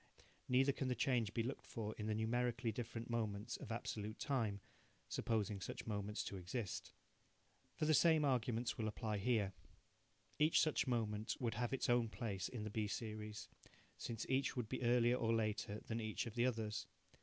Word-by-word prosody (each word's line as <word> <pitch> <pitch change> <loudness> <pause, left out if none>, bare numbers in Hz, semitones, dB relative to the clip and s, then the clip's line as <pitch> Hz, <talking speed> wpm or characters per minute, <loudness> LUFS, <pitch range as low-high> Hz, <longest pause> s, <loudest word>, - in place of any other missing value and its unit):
Neither 130 +2 +5
can 135 -1 -2
the 125 - +1
change 120 -3 +2
be 115 0 0
looked 130 +4 -4
for 110 -2 -3
in 105 - -4
the 110 - +1
numerically 120 +1 +1
different 115 0 -4
moments 110 -1 -1
of 115 - -7
absolute 110 -1 -3
time, 115 -8 0 0.5
supposing 105 -3 0
such - - -5
moments 105 -1 -2
to 100 - -4
exist. 95 +4 -3 0.8
For - - 0
the 155 - +5
same 155 0 +6
arguments 120 -3 +1
will 110 - +1
apply 110 -1 -2
here. 105 -3 +2 0.9
Each 155 +2 +6
such 155 -4 +3
moment 110 -3 0
would 120 -3 0
have 120 +1 -1
its 135 - 0
own 120 -2 +4
place 100 -2 -3
in 120 -4 -4
the 105 - -4
B 105 0 0
series, 105 0 -4 0.5
since 115 -1 -4
each 135 +1 +2
would 120 -3 -1
be - - -2
earlier 120 0 +4
or 115 -2 +2
later 110 -1 -1
than 115 0 -3
each 110 -1 -1
of 115 - -5
the 120 +2 +3
others. 110 -3 -2
115 Hz, 180 wpm, -40 LUFS, 105-125 Hz, 0.9 s, same